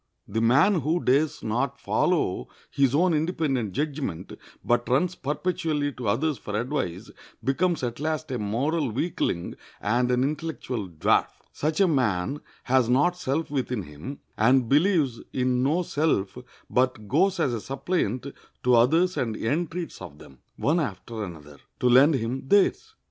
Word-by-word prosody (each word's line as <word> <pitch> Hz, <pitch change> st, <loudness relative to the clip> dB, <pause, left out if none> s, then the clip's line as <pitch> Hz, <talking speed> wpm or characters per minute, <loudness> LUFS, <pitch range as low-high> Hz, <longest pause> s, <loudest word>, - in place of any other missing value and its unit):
The 110 Hz, +3 st, -1 dB
man 140 Hz, -, +4 dB
who 160 Hz, +5 st, +1 dB
dares 145 Hz, +4 st, +1 dB
not 125 Hz, +5 st, -1 dB
follow 170 Hz, -, 0 dB, 0.2 s
his 140 Hz, -1 st, +2 dB
own 175 Hz, +3 st, +3 dB
independent 150 Hz, -, 0 dB
judgment, 140 Hz, -, -3 dB, 0.3 s
but 120 Hz, +1 st, +1 dB
runs 155 Hz, +8 st, +2 dB
perpetually 150 Hz, -1 st, -1 dB
to 125 Hz, -3 st, -6 dB
others 140 Hz, +8 st, 0 dB
for 105 Hz, 0 st, -3 dB
advice, 110 Hz, -, -3 dB, 0.3 s
becomes 160 Hz, +4 st, +1 dB
at 120 Hz, 0 st, -3 dB
last 155 Hz, -1 st, -2 dB
a 125 Hz, -, -2 dB
moral 135 Hz, +8 st, 0 dB
weakling 110 Hz, -, -2 dB, 0.2 s
and 120 Hz, +4 st, +1 dB
an 125 Hz, 0 st, +2 dB
intellectual 140 Hz, -, -3 dB
dwarf. 80 Hz, -3 st, +2 dB, 0.3 s
Such 155 Hz, +1 st, -1 dB
a 195 Hz, -, +5 dB
man 130 Hz, -, 0 dB, 0.2 s
has 130 Hz, -2 st, +2 dB
not 145 Hz, +8 st, +3 dB
self 160 Hz, -2 st, -2 dB
within 125 Hz, -6 st, -2 dB
him, 75 Hz, -, -8 dB, 0.2 s
and 125 Hz, +3 st, +4 dB
believes 145 Hz, -, +2 dB
in 125 Hz, -1 st, +1 dB
no 155 Hz, +7 st, +2 dB
self, 145 Hz, -, 0 dB, 0.3 s
but 125 Hz, -4 st, 0 dB
goes 180 Hz, -, +2 dB
as 135 Hz, -6 st, +1 dB
a 115 Hz, -, -3 dB
suppliant 135 Hz, -, -2 dB, 0.4 s
to 125 Hz, -, +3 dB
others 160 Hz, +10 st, +4 dB
and 115 Hz, -4 st, -1 dB
entreats 165 Hz, +7 st, -3 dB
of 75 Hz, -, -9 dB
them, 65 Hz, -3 st, -15 dB, 0.2 s
one 160 Hz, +5 st, +1 dB
after 115 Hz, -, -4 dB
another, 75 Hz, -6 st, -10 dB, 0.2 s
to 125 Hz, -, +2 dB
lend 135 Hz, +5 st, +6 dB
him 130 Hz, +2 st, -3 dB
theirs. 205 Hz, -, +2 dB
135 Hz, 150 wpm, -26 LUFS, 115-155 Hz, 0.4 s, lend